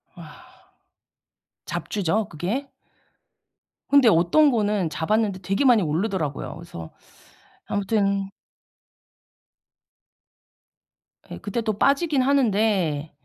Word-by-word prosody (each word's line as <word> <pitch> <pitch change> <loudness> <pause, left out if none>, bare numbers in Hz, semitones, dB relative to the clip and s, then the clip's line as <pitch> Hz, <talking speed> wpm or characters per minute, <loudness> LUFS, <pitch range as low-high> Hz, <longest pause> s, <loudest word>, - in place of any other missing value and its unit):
와. - - -14 1.2
잡주죠 205 +2 -2
그게? 200 - -4 1.2
근데 280 -3 +5
어떤 180 - +4
거는 210 -6 0
잡았는데 200 +5 -1
되게 195 +9 -1
많이 245 -5 +5
오르더라고요. 160 -3 -2
그래서 160 - -10 0.8
아무튼 200 -1 -1 3.0
예 - - -7
그때 215 +3 -4
또 220 -1 -1
빠지긴 280 +3 +2
하는데. 205 - +1
205 Hz, 190 characters per minute, -23 LUFS, 170-230 Hz, 3.0 s, 근데